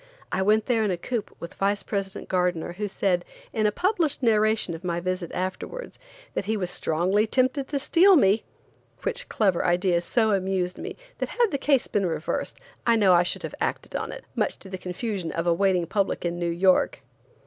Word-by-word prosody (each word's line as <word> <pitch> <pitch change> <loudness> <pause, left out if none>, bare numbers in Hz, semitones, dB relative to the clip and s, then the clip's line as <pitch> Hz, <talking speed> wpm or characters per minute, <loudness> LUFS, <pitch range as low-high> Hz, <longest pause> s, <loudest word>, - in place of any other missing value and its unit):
I 185 - 0
went 210 +2 +3
there 230 -3 +2
in 210 - +1
a 180 - 0
coupe 230 +5 -3
with 170 - -7
Vice 200 +1 0
President 195 -2 -4
Gardener 180 -2 0
who 205 +3 -3
said, 185 -2 0 0.3
in 215 -1 +2
a - - +2
published 345 - 0
narration 215 -4 +2
of 165 - -8
my 175 -1 -1
visit 180 -1 -3
afterwards, 185 - -5 0.3
that - - -2
he 220 +2 0
was 180 -3 -2
strongly 185 +7 +1
tempted 260 +3 +1
to 290 - -2
steal 355 +7 +5
me, 210 - +4 0.6
which - - -3
clever 195 -5 +2
idea 175 0 +2
so 220 +4 +2
amused 190 -2 0
me - - -6 0.2
that - - -2
had 475 -3 +1
the 280 - -1
case 275 -3 +3
been 200 -3 0
reversed, 160 -1 -3 0.3
I 235 - +4
know 200 -5 +5
I 175 - +6
should 175 - -2
have - - -5
acted - - -2
on - - -2
it, - - -9
much - - 0
to 195 - -9
the 185 -1 -6
confusion 185 -1 -4
of 165 - -2
a 170 - +4
waiting 185 -1 +2
public 195 +1 -1
in 175 0 -2
New 175 -1 0
York. 185 +2 +2
195 Hz, 205 wpm, -25 LUFS, 180-225 Hz, 0.6 s, I